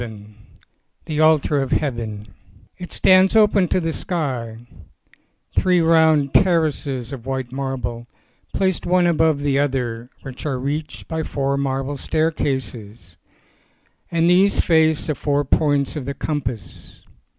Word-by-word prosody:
VII 105 Hz, -3 st, -9 dB, 0.7 s
THE 155 Hz, -2 st, -3 dB
ALTAR 155 Hz, -2 st, +3 dB
OF 135 Hz, -, -2 dB
HEAVEN 110 Hz, -7 st, -3 dB, 0.5 s
IT 180 Hz, -, -8 dB
stands 185 Hz, +2 st, +4 dB
open 210 Hz, -4 st, +4 dB
to 185 Hz, -, +1 dB
the 165 Hz, -2 st, -2 dB
sky, 130 Hz, -12 st, -3 dB, 1.0 s
three 180 Hz, -1 st, +3 dB
round 160 Hz, -4 st, +3 dB
ter 175 Hz, -4 st, +4 dB
races 135 Hz, -4 st, -4 dB
of 130 Hz, -2 st, -9 dB
white 130 Hz, -2 st, -3 dB
marble, 130 Hz, -3 st, -4 dB, 0.4 s
placed 190 Hz, -2 st, -1 dB
one 180 Hz, 0 st, +3 dB
above 160 Hz, -3 st, +2 dB
the 140 Hz, -1 st, +1 dB
other, 125 Hz, -4 st, -2 dB
which 130 Hz, -2 st, -9 dB
are 140 Hz, -4 st, -2 dB
reached 145 Hz, +4 st, -4 dB
by 160 Hz, 0 st, -3 dB
four 140 Hz, -2 st, -2 dB
marble 135 Hz, 0 st, -2 dB
staircases, 130 Hz, -, -3 dB, 0.9 s
and 170 Hz, 0 st, +1 dB
these 185 Hz, +3 st, +4 dB
face 160 Hz, -2 st, +3 dB
the 155 Hz, -, -1 dB
four 145 Hz, +1 st, -1 dB
points 145 Hz, -1 st, +1 dB
of 145 Hz, -4 st, -5 dB
the 140 Hz, +1 st, -4 dB
compass. 130 Hz, -7 st, -5 dB
145 Hz, 135 wpm, -21 LUFS, 130-160 Hz, 1.0 s, stands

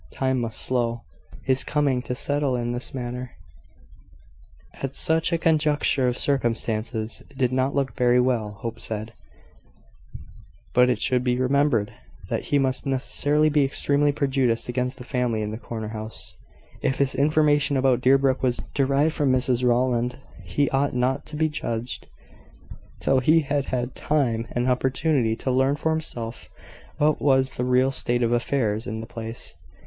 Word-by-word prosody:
Time 130 Hz, -1 st, -1 dB
must 115 Hz, -2 st, -2 dB
show. 120 Hz, -2 st, -1 dB, 0.4 s
His 130 Hz, 0 st, +1 dB
coming 140 Hz, -4 st, +1 dB
to 125 Hz, -, -4 dB
settle 145 Hz, 0 st, 0 dB
in 120 Hz, -1 st, -2 dB
this 120 Hz, +1 st, -2 dB
manner, 125 Hz, -1 st, -5 dB, 1.4 s
at 135 Hz, 0 st, -5 dB
such 160 Hz, 0 st, +1 dB
a 170 Hz, -, +2 dB
conjuncture 150 Hz, -4 st, +2 dB
of 125 Hz, 0 st, 0 dB
circumstances, 115 Hz, -4 st, -1 dB, 0.2 s
did 130 Hz, -2 st, +1 dB
not 130 Hz, +1 st, +1 dB
look 135 Hz, -4 st, 0 dB
very 125 Hz, +1 st, +3 dB
well, 120 Hz, -5 st, 0 dB
Hope 115 Hz, -1 st, -5 dB
said; 110 Hz, +1 st, -4 dB, 1.6 s
but 125 Hz, 0 st, +5 dB
it 120 Hz, -4 st, +1 dB
should 125 Hz, 0 st, +1 dB
be 125 Hz, -1 st, +1 dB
remembered 130 Hz, -4 st, +1 dB, 0.4 s
that -, -, -2 dB
he 145 Hz, -, +2 dB
must 130 Hz, 0 st, 0 dB
necessarily 145 Hz, +3 st, +1 dB
be 150 Hz, -1 st, +3 dB
extremely 145 Hz, +1 st, +1 dB
prejudiced 135 Hz, -5 st, 0 dB
against 125 Hz, +1 st, -2 dB
the 125 Hz, -, -9 dB
family 120 Hz, -3 st, -1 dB
in 105 Hz, -, -3 dB
the 110 Hz, -, -6 dB
corner 110 Hz, -3 st, -6 dB
house, 110 Hz, 0 st, -8 dB, 0.5 s
if 135 Hz, -, 0 dB
his 140 Hz, -1 st, +1 dB
information 145 Hz, -1 st, +2 dB
about 130 Hz, -2 st, +2 dB
Deerbrook 135 Hz, 0 st, +3 dB
was 125 Hz, -2 st, +1 dB
derived 140 Hz, +3 st, +2 dB
from 140 Hz, -3 st, +1 dB
Mrs 125 Hz, -1 st, +1 dB
Rowland. 125 Hz, 0 st, +1 dB, 0.3 s
He 140 Hz, +10 st, 0 dB
ought 135 Hz, 0 st, +1 dB
not 125 Hz, +2 st, 0 dB
to 150 Hz, -, -8 dB
be 155 Hz, +1 st, +2 dB
judged 120 Hz, -5 st, -4 dB, 0.9 s
till 135 Hz, -, +2 dB
he 155 Hz, +5 st, +4 dB
had 145 Hz, -1 st, -1 dB
had 125 Hz, 0 st, -2 dB
time 120 Hz, -7 st, 0 dB
and 120 Hz, +1 st, -1 dB
opportunity 130 Hz, -1 st, +1 dB
to 130 Hz, -, -2 dB
learn 130 Hz, +2 st, +2 dB
for 160 Hz, +2 st, -1 dB
himself 120 Hz, -8 st, -4 dB, 0.5 s
what 150 Hz, 0 st, +2 dB
was 135 Hz, -1 st, +3 dB
the 125 Hz, -, -2 dB
real 125 Hz, +1 st, +3 dB
state 120 Hz, -2 st, 0 dB
of 115 Hz, -, +1 dB
affairs 120 Hz, -3 st, 0 dB
in 110 Hz, +2 st, -4 dB
the 110 Hz, -, -6 dB
place. 115 Hz, 0 st, -7 dB
130 Hz, 160 wpm, -24 LUFS, 120-140 Hz, 1.6 s, but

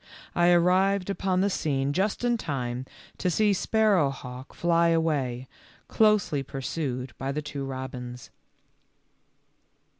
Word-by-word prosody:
I 175 Hz, 0 st, +4 dB
arrived 185 Hz, +3 st, +3 dB
upon 190 Hz, -2 st, 0 dB
the 200 Hz, -, +2 dB
scene 140 Hz, -4 st, 0 dB
just 195 Hz, +7 st, 0 dB
in 240 Hz, 0 st, +2 dB
time 130 Hz, -, -3 dB, 0.3 s
to 180 Hz, -, +1 dB
see 205 Hz, +3 st, +3 dB
Sparrowhawk 145 Hz, -, 0 dB
fly 170 Hz, 0 st, +2 dB
away, 145 Hz, -7 st, 0 dB, 0.4 s
closely 210 Hz, -9 st, +3 dB
pursued 135 Hz, -1 st, -4 dB
by 135 Hz, +1 st, -2 dB
the 150 Hz, +2 st, -3 dB
two 140 Hz, -1 st, -5 dB
robins. 125 Hz, -2 st, -6 dB
155 Hz, 115 wpm, -27 LUFS, 135-185 Hz, 0.4 s, I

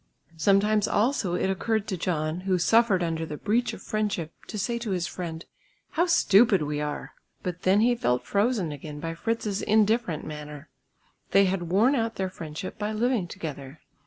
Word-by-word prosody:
Sometimes 200 Hz, +5 st, +3 dB
also 210 Hz, -5 st, +1 dB
it 185 Hz, -, 0 dB
occurred 220 Hz, +3 st, -1 dB
to 190 Hz, -, -1 dB
John, 160 Hz, -2 st, -1 dB
who 185 Hz, 0 st, 0 dB
suffered 205 Hz, 0 st, +3 dB
under 165 Hz, -1 st, -1 dB
the 150 Hz, -2 st, -5 dB
breach 230 Hz, +6 st, 0 dB
of -, -, -10 dB
friendship 205 Hz, -7 st, -2 dB
to 215 Hz, -, -6 dB
say 235 Hz, +4 st, -1 dB
to 235 Hz, -2 st, -5 dB
his 180 Hz, -3 st, 0 dB
friend, 165 Hz, -3 st, -6 dB, 0.5 s
"How 345 Hz, +2 st, +1 dB
stupid 210 Hz, -, +5 dB
we 150 Hz, 0 st, -2 dB
are!" 150 Hz, 0 st, -4 dB, 0.3 s
But 180 Hz, -1 st, -4 dB
then 195 Hz, +3 st, +4 dB
he 245 Hz, +2 st, +4 dB
felt 125 Hz, -, 0 dB
frozen 200 Hz, -5 st, +1 dB
again 150 Hz, +1 st, -7 dB
by 165 Hz, +2 st, -4 dB
Fritz's 210 Hz, +2 st, -2 dB
indifferent 215 Hz, -6 st, +2 dB
manner. 150 Hz, -1 st, -8 dB, 0.6 s
They 195 Hz, 0 st, +6 dB
had 185 Hz, -3 st, -1 dB
worn 215 Hz, +9 st, +4 dB
out 225 Hz, -4 st, 0 dB
their 190 Hz, -1 st, -2 dB
friendship 165 Hz, +3 st, -7 dB
by 210 Hz, +1 st, -2 dB
living 230 Hz, -3 st, +1 dB
together. 145 Hz, -3 st, -7 dB
190 Hz, 175 wpm, -26 LUFS, 160-220 Hz, 0.6 s, They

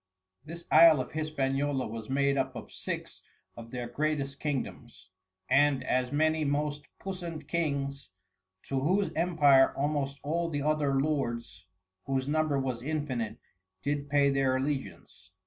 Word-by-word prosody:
This 170 Hz, +2 st, -9 dB
Isle 165 Hz, -3 st, +8 dB
of 130 Hz, -, -4 dB
Hispaniola 140 Hz, -3 st, -1 dB
was 110 Hz, +1 st, -7 dB
made 140 Hz, +1 st, +2 dB
up 130 Hz, -1 st, -1 dB
of -, -, -8 dB
Six -, -, -5 dB, 0.3 s
of 115 Hz, 0 st, -10 dB
their 120 Hz, 0 st, -4 dB
greatest 140 Hz, +1 st, -2 dB
Kingdoms, 120 Hz, -8 st, -5 dB, 0.4 s
and 135 Hz, 0 st, +3 dB
as 125 Hz, -1 st, 0 dB
many 155 Hz, +1 st, +2 dB
most 145 Hz, 0 st, -1 dB
Puissant 175 Hz, -5 st, -6 dB
Kings, 140 Hz, -, -2 dB, 0.5 s
to 135 Hz, -, -2 dB
whose 185 Hz, +8 st, +1 dB
Empire 150 Hz, -6 st, +4 dB
almost 140 Hz, -1 st, -1 dB
all 165 Hz, +3 st, -1 dB
the 145 Hz, -3 st, -2 dB
other 145 Hz, -3 st, +1 dB
Lords, 120 Hz, -10 st, -2 dB, 0.4 s
whose 135 Hz, -1 st, -1 dB
Number 155 Hz, -1 st, +1 dB
was 130 Hz, -3 st, -2 dB
infinite, 130 Hz, -6 st, -3 dB, 0.5 s
did 145 Hz, 0 st, -2 dB
pay 140 Hz, -1 st, +4 dB
their 135 Hz, -1 st, +2 dB
Allegiance. 130 Hz, -, -4 dB
140 Hz, 135 wpm, -29 LUFS, 130-155 Hz, 0.5 s, Isle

